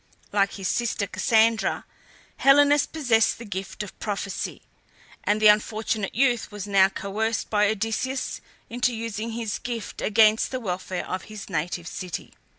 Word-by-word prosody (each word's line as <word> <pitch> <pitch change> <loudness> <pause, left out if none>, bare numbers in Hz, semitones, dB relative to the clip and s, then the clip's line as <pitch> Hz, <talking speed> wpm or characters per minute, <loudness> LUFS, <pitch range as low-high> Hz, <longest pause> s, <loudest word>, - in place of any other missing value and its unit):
Like 200 -1 +2
his 195 -2 -4
sister 235 -2 0
Cassandra, 220 +4 +2 0.5
Helenus 285 +1 +5
possessed 245 -8 +2
the 235 - -9
gift 195 +1 -5
of 205 - -11
prophecy, 200 -2 -4 0.6
and 210 +1 +1
the 215 - +1
unfortunate 215 0 +2
youth 245 -2 +2
was 205 -1 -6
now 195 -2 +4
coerced 215 +3 -2
by 210 -1 +4
Odysseus 225 +5 -2 0.3
into 245 0 0
using 225 0 -4
this 225 -4 -3
gift 235 -3 -5
against 215 0 +4
the 255 - -3
welfare 185 -4 -4
of 185 0 -4
his 215 -2 -9
native 170 +1 -2
city. 180 -3 -6
215 Hz, 145 wpm, -25 LUFS, 200-230 Hz, 0.6 s, Helenus